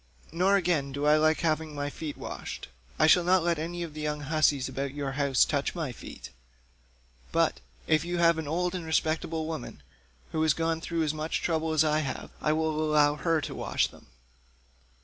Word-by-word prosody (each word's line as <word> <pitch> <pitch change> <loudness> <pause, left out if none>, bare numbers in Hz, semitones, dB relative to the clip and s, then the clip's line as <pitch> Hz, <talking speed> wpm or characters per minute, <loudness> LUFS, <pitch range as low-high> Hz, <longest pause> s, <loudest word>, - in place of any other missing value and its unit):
Nor, 185 +5 +3
again, 170 -8 +1
do 140 +2 -3
I 150 +1 +6
like 155 +1 +3
having 155 -2 0
my 145 0 -3
feet 155 -1 -6
washed; - - -7 0.3
I - - +4
shall 175 +3 +6
not 180 0 +3
let 170 -2 +1
any 175 +2 -3
of 165 -3 -7
the 155 - -6
young 150 0 -2
hussies 145 -2 +2
about 140 0 -4
your 140 -2 -2
house 140 -2 +3
touch 145 +2 -1
my 160 -6 -2
feet; 120 - -10 1.0
but, - - +2 0.3
if 155 -1 +3
you 175 +1 -2
have 170 -1 +4
any 160 - -4
old 175 +4 0
and 180 -2 -4
respectable 160 0 0
woman 155 - -6 0.5
who 155 - -1
has 155 -2 +3
gone 165 0 -1
through 165 -1 -1
as 155 -1 0
much 155 +1 -3
trouble 160 -1 0
as 155 -1 +4
I 155 0 +2
have, 140 -4 -4
I 150 - +2
will 155 0 0
allow 150 -1 +4
her 165 0 +1
to - - -5
wash - - 0
them." - - -18
155 Hz, 200 wpm, -28 LUFS, 150-165 Hz, 1.0 s, I